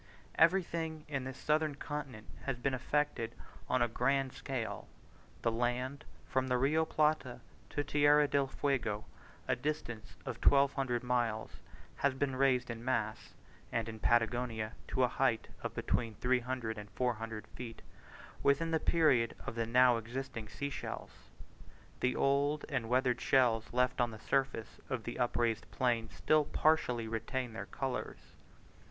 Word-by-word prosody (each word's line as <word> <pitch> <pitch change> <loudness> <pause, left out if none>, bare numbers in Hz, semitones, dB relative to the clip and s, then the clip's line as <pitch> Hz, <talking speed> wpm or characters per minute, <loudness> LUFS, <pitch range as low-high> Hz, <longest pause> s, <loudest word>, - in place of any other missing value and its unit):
Everything 165 -2 +2
in 135 -4 -3
this 130 +1 -6
southern 155 -1 +1
continent 140 -7 -5 0.2
has 135 -3 -1
been 130 +2 0
effected 130 -3 -1 0.3
on 130 - +3
a - - +2
grand 135 +3 +1
scale: 130 -5 -4 0.6
the 115 - +3
land, 125 +4 -1 0.2
from 130 0 0
the 125 -1 +2
Rio 150 +5 +3
Plata 150 -6 +1 0.3
to 145 - -1
Tierra 145 +1 +5
del 140 -1 +2
Fuego, 120 -7 -1 0.4
a - - +2
distance 120 - -4
of - - -4
1200 135 -3 +3
miles, 120 -3 -1 0.4
has 140 -1 +2
been 135 -1 0
raised 130 -2 +2
in 115 0 -7
mass 115 -4 -2 0.4
(and 115 -1 -1
in 110 -1 -6
Patagonia 115 -1 +1 0.2
to - - +1
a - - +5
height - - +1
of - - -4
between 115 -3 -1
300 125 -2 -1
and 105 0 -9
400 115 +1 -2
feet), 115 -2 -8 0.6
within 145 +4 +3
the 160 - +2
period 145 -10 +3
of - - -3
the 115 -1 -1
now 125 0 +5
existing 115 -1 -5
sea 140 +6 -4
shells. - - -5 0.9
The 125 0 +1
old 140 +2 +2
and 130 -6 -1
weathered 125 -1 +2
shells 115 -4 +3
left 125 +1 +2
on 120 - +2
the 110 - -8
surface 130 -1 -1
of 130 -4 -2
the 120 - -5
upraised 120 -2 0
plain 120 -3 0
still 155 -1 +2
partially 125 -9 +2
retain 115 +2 -3
their 100 -2 -6
colours. 135 -2 -4
125 Hz, 145 wpm, -34 LUFS, 115-140 Hz, 0.9 s, Tierra